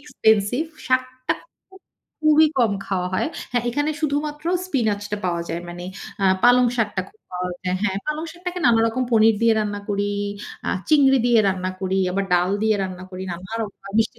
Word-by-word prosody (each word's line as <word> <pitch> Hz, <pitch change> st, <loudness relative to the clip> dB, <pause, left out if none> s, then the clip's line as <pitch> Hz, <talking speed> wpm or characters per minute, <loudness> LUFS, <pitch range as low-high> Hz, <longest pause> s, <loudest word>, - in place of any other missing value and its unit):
Expensive, 220 Hz, 0 st, +2 dB, 0.2 s
শাকটা 255 Hz, 0 st, 0 dB, 0.3 s
খুব, 380 Hz, 0 st, -17 dB, 0.4 s
খুবই 310 Hz, 0 st, +6 dB
কম 230 Hz, -4 st, +3 dB
খাওয়া 180 Hz, -2 st, -1 dB
হয়। -, -, +1 dB, 0.3 s
হ্যাঁ, 245 Hz, -2 st, +1 dB
এখানে 290 Hz, +5 st, 0 dB
শুধুমাত্র 295 Hz, 0 st, -2 dB, 0.2 s
স্পিনাচটা 210 Hz, -, -1 dB
পাওয়া 170 Hz, -2 st, 0 dB
যায়। 170 Hz, -, -3 dB
মানে 175 Hz, +1 st, -7 dB, 0.4 s
আ -, -, +3 dB, 0.2 s
পালং 245 Hz, +1 st, +6 dB
শাকটা 210 Hz, -4 st, 0 dB
খুব 215 Hz, -, -28 dB
পাওয়া 180 Hz, 0 st, -3 dB
যায়। 180 Hz, 0 st, 0 dB
হ্যাঁ, 195 Hz, -2 st, 0 dB
পালং 305 Hz, +1 st, -2 dB
শাকটাকে 360 Hz, +1 st, -5 dB
নানারকম 230 Hz, +1 st, +3 dB
পনির 220 Hz, -1 st, +5 dB
দিয়ে 230 Hz, 0 st, +5 dB
রান্না 205 Hz, -1 st, -2 dB
করি, 205 Hz, 0 st, 0 dB, 0.6 s
আ -, -, 0 dB, 0.2 s
চিংড়ি 275 Hz, -3 st, +5 dB
দিয়ে 240 Hz, -1 st, +5 dB
রান্না 185 Hz, -1 st, -1 dB
করি 190 Hz, 0 st, 0 dB
আবার 195 Hz, +2 st, 0 dB
ডাল 180 Hz, +1 st, +2 dB
দিয়ে 220 Hz, -1 st, +3 dB
রান্না 185 Hz, -1 st, -5 dB
করি, 185 Hz, 0 st, -6 dB
নানান 185 Hz, +6 st, -6 dB
রকম 205 Hz, -3 st, -7 dB, 0.2 s
মিষ্টি 225 Hz, -, +1 dB
220 Hz, 175 wpm, -22 LUFS, 190-260 Hz, 0.6 s, খুবই